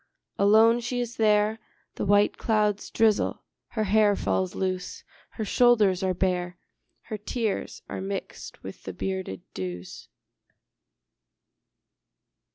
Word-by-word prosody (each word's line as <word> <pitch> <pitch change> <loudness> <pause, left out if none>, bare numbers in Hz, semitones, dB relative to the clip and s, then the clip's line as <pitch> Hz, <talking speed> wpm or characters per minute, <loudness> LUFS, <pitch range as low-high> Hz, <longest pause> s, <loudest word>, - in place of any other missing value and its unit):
Alone 220 +4 +6
she 240 +1 -3
is 240 0 -4
there: 215 0 +3 0.3
The - - -3
white 205 +1 +4
clouds 210 -2 0
drizzle: 220 -2 +1 0.2
her 220 - -2
hair 210 0 +4
falls 95 - -1
loose; 185 -1 -3 0.3
Her 220 - -5
shoulders 215 -5 +4
are 185 -1 0
bare; 180 -1 -1 0.5
Her 215 - -6
tears 220 0 -3
are - - -5
mixed 195 0 -6
with - - -9
the - - -7
bearded 190 - -4
dews. 90 -1 -6
205 Hz, 115 wpm, -26 LUFS, 185-220 Hz, 0.5 s, Alone